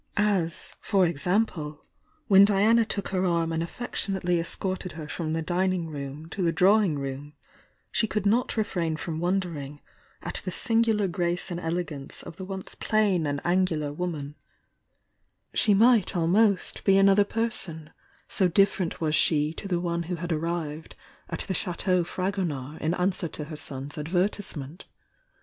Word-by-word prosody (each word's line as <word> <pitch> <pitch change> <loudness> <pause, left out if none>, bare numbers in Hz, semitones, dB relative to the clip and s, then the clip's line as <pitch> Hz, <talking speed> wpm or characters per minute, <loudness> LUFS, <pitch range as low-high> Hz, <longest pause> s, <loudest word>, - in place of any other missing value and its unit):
As, 190 -6 +1
for 195 -3 +2
example, 170 -2 0 0.4
when 195 -3 +8
Diana 210 +3 +4
took 200 -2 -2
her 185 -1 0
arm 170 -2 +1
and 165 0 -1
affectionately 185 -2 -2
escorted 185 +2 -3
her 155 -1 -7
from 155 +1 -3
the 165 0 -1
dining 180 +1 0
room 145 +1 -6
to 195 - -4
the 170 -2 +2
drawing 185 -1 +4
room, 140 +1 -5 0.6
she 225 - +2
could 210 -1 -2
not 230 +4 +2
re 220 - +3
frain 165 -6 -2
from 160 +1 -4
wondering 170 -6 -2 0.4
at - - -2
the - - -3
singular 225 -3 +2
grace 175 0 -2
and 175 - -3
ele 175 +1 -1
gance 140 -5 -8
of 165 - -10
the 190 - -6
once 190 0 -6
plain 200 -7 +1
and 145 0 -2
angular 175 -5 +1
woman, 150 -4 -4 0.7
— - - -48
she 210 -2 +5
might 220 -4 +4
almost 190 +4 +2
be 195 -1 +5
another 195 +1 +6
person, 190 -8 -4 0.4
so 190 - +2
different 185 -1 +1
was 155 -2 +1
she 155 -1 +2
to 195 - -6
the 175 -3 0
one 170 -1 -1
who 180 - -1
had 175 +1 -5
arrived 160 -1 -3 0.3
at 165 - -2
the 190 - -3
Chateau 180 0 0
Frag 185 +3 -3
oriard 150 -4 -4
in 160 +3 0
answer 180 -1 0
to 155 - -6
her 155 +1 -7
son's 140 0 -5
advertisement. 175 -2 -2
175 Hz, 165 wpm, -27 LUFS, 155-195 Hz, 0.7 s, when